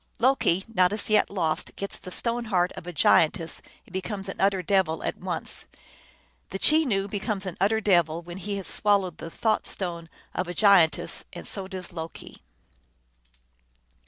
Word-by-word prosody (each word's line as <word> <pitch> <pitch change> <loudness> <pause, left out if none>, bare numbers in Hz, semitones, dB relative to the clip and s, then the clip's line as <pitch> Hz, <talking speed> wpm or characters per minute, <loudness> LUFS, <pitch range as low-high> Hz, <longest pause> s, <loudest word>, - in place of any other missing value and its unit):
Loki, 230 -7 +2
not 185 -5 +2
as 210 +1 -2
yet 215 - +4
lost, 165 -6 -2
gets 200 - -1
the - - -9
stone 235 +5 -1
heart 185 -4 +1
of 175 - -10
a - - -4
giantess, 165 +1 +2 0.2
and - - -19
becomes 195 +1 -4
an 195 - -6
utter 195 -1 +2
devil 180 -3 +1
at - - -2
once. - - -2 0.8
The - - -4
Chenoo 240 -7 +3
becomes 205 0 -3
an 185 -3 -5
utter 215 +3 +3
devil 175 -5 +2
when 175 +1 -8
he 200 +2 -3
has 195 - -5
swallowed 195 -5 +1
the 165 - -6
thought 215 +5 0
stone 170 -3 -5 0.2
of 185 - -2
a 175 - -5
giantess, 195 -7 +4
and - - -8
so 195 -2 -2
does 185 -2 -7
Loki. 165 -1 -8
190 Hz, 165 wpm, -26 LUFS, 175-205 Hz, 0.8 s, yet